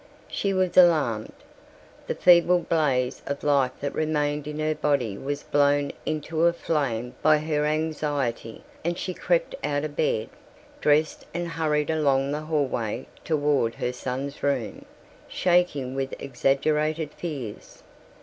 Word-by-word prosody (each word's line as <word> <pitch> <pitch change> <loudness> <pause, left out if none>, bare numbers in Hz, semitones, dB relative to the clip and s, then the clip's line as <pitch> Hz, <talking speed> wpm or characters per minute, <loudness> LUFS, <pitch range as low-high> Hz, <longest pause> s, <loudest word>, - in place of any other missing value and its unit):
She 200 - -1
was 185 -2 0
alarmed. 150 -12 +4 0.8
The - - -2
feeble 175 0 +6
blaze 145 -7 0
of 140 0 -4
life 140 -3 +2
that 140 0 -2
remained 150 -1 -1
in 150 0 -5
her 155 0 0
body 140 -9 0
was 140 +7 -4
blown 145 0 +2 0.2
into 155 +2 +1
a 170 - +3
flame 130 -8 -2
by 155 0 +5
her 150 -1 -1
anxiety 150 -7 -2 0.2
and 170 +1 -1
she 185 - -3
crept - - 0
out 145 0 0
of 150 -1 -6
bed, 110 -8 0 0.5
dressed 150 +1 +1
and 175 0 -2
hurried 155 -2 0
along 140 -3 +2
the 150 +1 -2
hallway 135 -7 -1 0.2
toward 145 -7 +1
her 125 - -2
son's 135 +3 -5
room, 135 -6 -2 0.4
shaking 175 -8 +1
with 135 0 -3
exaggerated 150 +4 0
fears. 135 -11 -7
150 Hz, 135 wpm, -25 LUFS, 135-155 Hz, 0.8 s, feeble